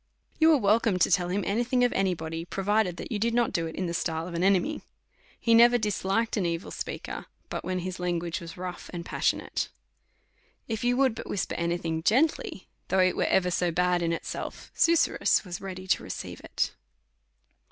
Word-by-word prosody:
You 320 0 +6
was 300 -5 +5
welcome 210 -1 +3
to 180 - +3
tell 175 -1 +3
him 195 +2 0
any 220 +5 +1
thing 250 +1 +1
of 245 - +2
any 190 -2 +1
body, 160 0 -5
provided 195 0 0
that - - -7
you 215 - -1
did 230 +2 +1
not 240 -1 +2
do 165 -1 0
it 160 - -7
in 185 - -2
the 170 - -3
style 165 -1 -2
of 180 - -7
an 170 +1 -1
enemy. 190 -2 +2 0.6
He 230 - +3
never 240 +1 +7
dis 210 -3 -2
liked 225 +5 +1
an 200 - +1
evil 170 +1 -3
speaker, - - -5 0.2
but - - -4
when 185 0 -2
his 185 0 -5
language 175 +1 -2
was 165 0 -9
rough 180 0 -6
and 170 -1 -5
passionate. - - -1 1.0
If 225 -1 -3
you 245 0 +2
would 265 -3 +3
but 225 - -8
whisper 200 - -2
any 170 0 0
thing 160 -2 -3
gently, 240 - +1 0.2
though 190 - +1
it 185 -1 +4
was - - +1
ever 180 -1 +3
so 175 0 +1
bad 180 +1 +2
in 170 -1 0
itself, 165 - -5
Su 335 - +4
surrus 315 - +2
was 175 -1 -6
ready 185 -1 -6
to - - +3
receive - - -6
it. - - -2
185 Hz, 210 wpm, -28 LUFS, 175-225 Hz, 1.0 s, never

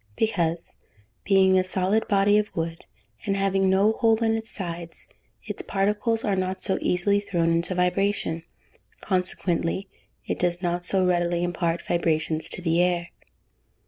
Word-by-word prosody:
_ - - -31
Because, 170 -6 -1 0.5
being 190 -1 +5
a - - +2
solid 190 +3 0
body 205 0 +4
of 210 - -2
wood, 165 0 -4 0.4
and 195 0 -1
having 195 -1 +2
no 195 +3 +4
hole 225 0 +2
in 225 0 +2
its 225 0 -3
sides, 170 -3 -4 0.4
its - - -3
particles 210 +3 0
are 205 -3 +1
not 185 0 -2
so 190 - +1
easily 200 +3 +2
thrown 170 -5 0
into 170 +2 0
vibration; 180 -2 0 0.6
consequently 185 -1 -1 0.4
it - - -3
does 175 -1 +1
not 175 -1 -2
so 185 +1 +2
readily 175 -1 +1
impart 175 -1 -1
vibrations 160 -2 0
to 180 - -3
the 165 0 +2
air. 175 -1 0
185 Hz, 150 wpm, -25 LUFS, 170-200 Hz, 0.6 s, being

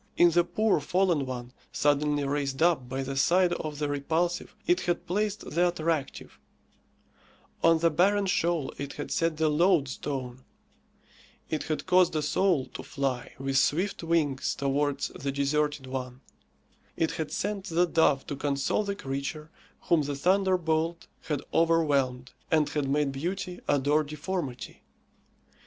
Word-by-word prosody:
In 175 0 +6
the 175 +1 +4
poor 215 +2 +1
fallen 170 -2 +1
one, 125 -1 -6 0.2
suddenly 145 0 +1
raised 140 +1 -1
up, 160 -8 +2
by 135 +1 -2
the 135 +1 -4
side 175 +6 +3
of 155 -3 -4
the 150 0 -1
repulsive, 160 +5 -1
it 355 +2 +2
had 175 -1 -1
placed 205 +3 -2
the 175 +3 +3
attractive; 160 -4 -3 1.2
on 165 0 +6
the 165 +1 +2
barren 195 +5 +3
shoal 170 -5 0
it 140 0 -5
had - - -6
set 165 -2 0
the 160 0 +2
loadstone; 140 -6 0 1.1
it 155 - -2
had 155 - -3
caused 180 -2 +4
a 155 - 0
soul 150 -1 +2
to - - -6
fly 135 -3 -3
with 135 0 +1
swift 180 +9 0
wings 160 -5 0
towards 140 0 0
the 140 +1 -4
deserted 145 0 0
one; 130 -1 -5 0.8
it 160 - +1
had 155 - -4
sent 200 -1 -2
the 175 -1 +2
dove 155 -5 +2
to 145 - -4
console 140 +7 0
the 200 -1 -3
creature 140 +1 -5 0.3
whom 170 -3 +2
the 145 0 -3
thunderbolt 170 -1 +1 0.2
had 145 -2 -2
overwhelmed, 140 -6 +2 0.2
and 155 -2 +3
had 145 -3 -2
made 145 0 +1
beauty 180 +5 -4
adore 145 +2 +3
deformity. 150 -3 -5
150 Hz, 145 wpm, -28 LUFS, 140-175 Hz, 1.2 s, In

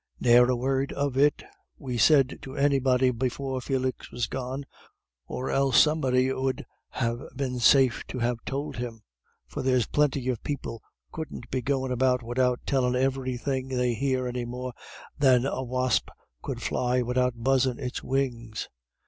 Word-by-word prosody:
"Ne'er 125 0 +6
a 125 - +3
word 135 +2 0
of 140 -2 -1
it 145 +2 +3 0.3
we 130 -3 -5
said 135 +1 +4
to 135 0 -9
anybody 130 -2 +3
before 130 +2 -2
Felix 130 -1 -2
was 120 0 -2
gone, 130 +1 -5 0.6
or 130 - -3
else 135 -2 +4
somebody 130 -4 +3
'ud 130 -1 -2 0.2
ha' 115 -1 -1 0.2
been 130 -3 -2
safe 130 0 +5
to 130 - -5
ha' 120 +1 +1
tould 140 0 -4
him, 115 -3 -6 0.4
for 60 - -6
there's 125 -3 +2
plinty 140 -3 +1
of 125 -4 -2
people 130 -6 -5 0.3
couldn't 150 -6 -7
be 130 - 0
goin' 130 0 -1
about 125 0 +2
widout 125 +1 +1
tellin' 125 -3 +1
everythin' 130 0 -1
they 125 -2 0
hear 130 +2 0
any 125 0 -3
more 125 +1 -5 0.5
than 130 -3 +5
a 135 - -2
wasp 130 0 0 0.3
could - - -5
fly 125 0 +1
widout 125 0 +1
buzzin' 130 +1 +2
its 125 -2 -4
wings. 120 -5 -2
130 Hz, 155 wpm, -27 LUFS, 125-135 Hz, 0.6 s, Ne'er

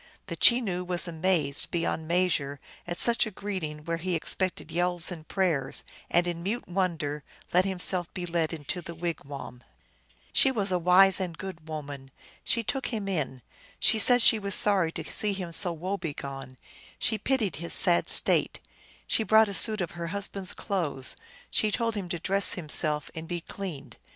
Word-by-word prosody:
The - - -6
Chenoo 210 -8 +3
was 180 0 -1
amazed 160 -4 0
be 170 - -1
yond 160 -1 -3
measure 165 -5 0 0.3
at 175 0 -4
such 235 -1 +4
a - - -4
greeting 180 -7 -6
where 170 0 -2
he 180 +1 -2
expected 180 0 -2
yells 175 +1 -1
and 160 -3 -9
prayers, 170 -9 0 0.3
and 175 +1 +3
in 170 -1 -4
mute 210 +7 -3
wonder 170 -6 -2 0.3
let 180 +1 +4
himself 180 -2 -2
be 180 - -4
led 165 -2 -1
into 165 +3 -5
the 170 0 -9
wigwam. 145 -7 -6 0.7
She - - +4
was 205 -7 0
a 180 - +1
wise 185 +3 +6
and 175 -4 -4
good 175 -4 -8
woman. 145 -3 -7 0.3
She 230 - 0
took 270 +4 -2
him 215 -4 -4
in; 145 - -3 0.4
she 220 - +3
said 245 +2 +5
she 225 - +5
was 200 -2 +1
sorry 190 -6 +2
to - - -4
see 210 -1 -2
him 185 -3 -5
so 175 +2 +7
woe 180 +5 -4
begone; 135 -5 -7 0.4
she 220 -1 0
pitied 225 - -1
his 170 +2 +3
sad 175 -2 +4
state; - - +2 0.5
she - - +1
brought 220 0 +4
a - - -5
suit 215 +1 +5
of 175 - -3
her 170 -1 -6
husband 200 +1 -4
s - - +6
clothes; 160 - -1 0.4
she 215 - +2
told 230 +1 -1
him 195 -4 -5
to 175 - -2
dress 195 +4 +2
himself 150 -3 +1
and 160 0 -7
be 175 0 -3
cleaned. 175 -3 -7
175 Hz, 180 wpm, -27 LUFS, 160-195 Hz, 0.7 s, so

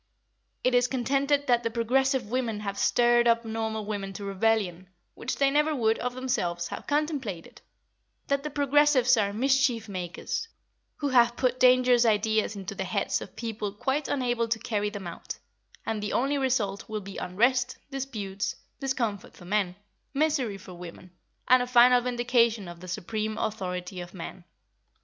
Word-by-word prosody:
It 255 - +2
is 245 0 +4
contended 275 +3 +1
that 240 -3 +3
the 230 - -1
progressive 255 +3 +1
women 235 -4 -1
have 200 -1 -3
stirred 240 0 +4
up 230 0 +3
normal 220 -1 -3
women 200 -2 -4
to 205 - -7
rebellion, 195 -3 0 0.2
which 255 - -4
they 275 -1 +3
never 300 +2 +2
would, 225 -3 +1
of 250 0 -3
themselves, 175 -10 -2
have - - -7
contemplated; 285 - -2 0.6
that 280 0 0
the 300 - -4
progressives 285 -2 +4
are 205 -3 +1
mischief 255 -1 +2
makers, 185 - -4 0.5
who 290 - -2
have 240 -2 +4
put 255 -1 +1
dangerous 250 -1 +5
ideas 220 -1 +2
into 195 -2 -6
the - - -3
heads - - -1
of - - -10
people 220 -3 -4
quite 270 +7 -1
unable 240 -4 0
to 225 0 0
carry 210 -2 -1
them 205 -2 -7
out, 170 - -7 0.5
and 220 -2 -2
the 210 - -3
only 275 +3 +1
result 225 -8 -1
will 215 -1 -3
be 195 0 -9
unrest, 245 +7 +1
disputes, 215 -8 -4 0.2
discomfort 245 -7 -2
for 175 - -13
men, 190 -1 0 0.4
misery 275 -8 +1
for 190 -1 -12
women, 175 +1 -10 0.4
and 255 0 +6
a 250 - -2
final 245 0 +6
vindication 240 -4 +1
of 175 0 -9
the 185 - -10
supreme 215 +3 -3
authority 180 -4 -3
of 175 +2 -10
man. 175 0 -8
230 Hz, 165 wpm, -27 LUFS, 205-255 Hz, 0.6 s, and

